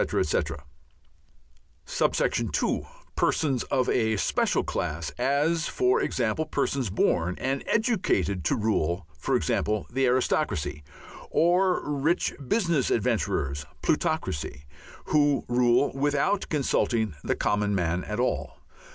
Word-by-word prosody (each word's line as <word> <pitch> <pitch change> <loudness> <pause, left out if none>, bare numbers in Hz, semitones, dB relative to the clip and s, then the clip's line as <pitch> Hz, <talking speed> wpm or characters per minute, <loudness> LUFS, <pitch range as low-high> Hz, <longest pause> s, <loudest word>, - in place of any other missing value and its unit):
etc.; 75 -1 0 1.2
(2) - - 0 0.3
persons 135 -6 +1
of 130 -2 0
a 110 -2 +1
special - - +1
class, 80 +1 -3
as, 150 +5 +1
for 125 0 +2
example, 120 +5 0
persons 140 -5 -1
born 90 -2 +1
and 135 +1 -2
educated 180 - +1
to - - +1
rule 95 -6 0 0.3
(e.g. - - +2 0.5
Aristocracy), 125 - 0 0.5
or 180 +1 +2
rich 150 +4 0
business 170 - +1
adventurers 70 - 0 0.2
(Plutocracy) 75 -1 -1 0.4
who 145 -2 +2
rule 120 +2 +3
without 145 +8 0
consulting 120 - +1
the - - 0
common 105 0 0
man 90 -1 0
at 105 +2 -4
all. 125 - -1
125 Hz, 100 wpm, -26 LUFS, 95-145 Hz, 1.2 s, rule